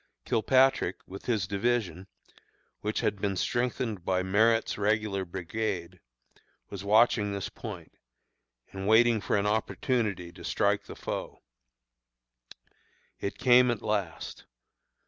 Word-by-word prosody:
Kilpatrick, 130 -4 +3
with 95 +1 -10
his 110 -6 +1
division, 100 -2 -1 0.7
which 105 +1 -2
had 100 -2 -1
been 100 -2 0
strengthened 120 -3 -1
by 95 0 0
Merritt's 110 +4 +2
Regular 105 -2 0
brigade, 90 0 -4 0.7
was 100 -1 -6
watching 105 0 +4
this 100 -1 -4
point, - - -9 0.8
and 95 0 -4
waiting 115 0 +5
for - - 0
an 100 - 0
opportunity 105 -3 -1
to - - -13
strike - - +1
the - - -9
foe. - - -6 1.8
It 100 - -4
came 125 0 +5
at 120 -3 -2
last. 100 -6 -3
105 Hz, 115 wpm, -29 LUFS, 95-115 Hz, 1.8 s, waiting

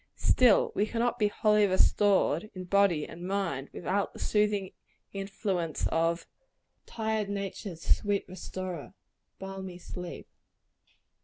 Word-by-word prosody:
Still 245 -5 +4
we 210 - +1
cannot 235 +1 0
be 210 - +4
wholly 210 0 +3
restored, 195 -1 +3
in 185 - -5
body 180 -4 +3
and 165 - -10
mind, 170 -9 -2
without 195 +3 -1
the - - -11
soothing 210 -2 +1 0.4
influence 195 -4 -2
of 165 +1 +1 0.6
"Tired 220 -2 -1
nature's 195 -3 -5 0.2
sweet 205 -1 0
restorer, 185 -2 -6 0.4
balmy 190 -1 -7
sleep." 180 0 -8
195 Hz, 110 wpm, -29 LUFS, 180-205 Hz, 0.6 s, Still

